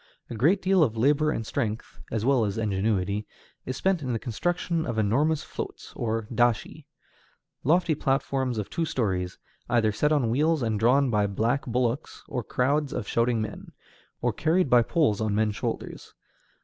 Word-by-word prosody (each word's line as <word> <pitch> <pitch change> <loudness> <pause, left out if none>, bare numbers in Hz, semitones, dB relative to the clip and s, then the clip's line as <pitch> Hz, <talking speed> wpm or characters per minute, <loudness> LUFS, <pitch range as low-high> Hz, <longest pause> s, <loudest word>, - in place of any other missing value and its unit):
A - - -4
great 160 - +2
deal 190 -1 +4
of 115 -6 0
labor 145 +6 +3
and 115 -7 -2
strength, 110 -3 -3
as 110 0 -2
well 130 -3 +3
as 100 -1 -2
ingenuity, 100 -1 0 0.4
is 130 - -3
spent 190 -3 +1
in 130 -3 -2
the - - 0
construction 170 - -1
of 120 -6 -3
enormous 140 +9 +2
floats, - - -7
or 115 -1 -2
dashi, 120 -2 0 0.8
lofty 165 +3 +3
platforms 135 -3 0
of 105 - -2
two 165 +1 -2
stories, 95 - -1 0.3
either 115 -3 +3
set 150 +8 +1
on 135 -7 +2
wheels 150 +3 +2
and 110 -2 0
drawn 130 +4 +3
by 105 -2 +2
black 115 +8 -1
bullocks 125 +3 -2
or 125 - -3
crowds 140 +6 0
of 105 - -4
shouting 115 -1 +1
men, 110 - -8 0.5
or - - +1
carried 160 -1 +1
by 120 -1 +7
poles 115 -4 +1
on 110 -2 0
men's 105 -1 +1
shoulders. - - -5
120 Hz, 170 wpm, -26 LUFS, 110-150 Hz, 0.8 s, by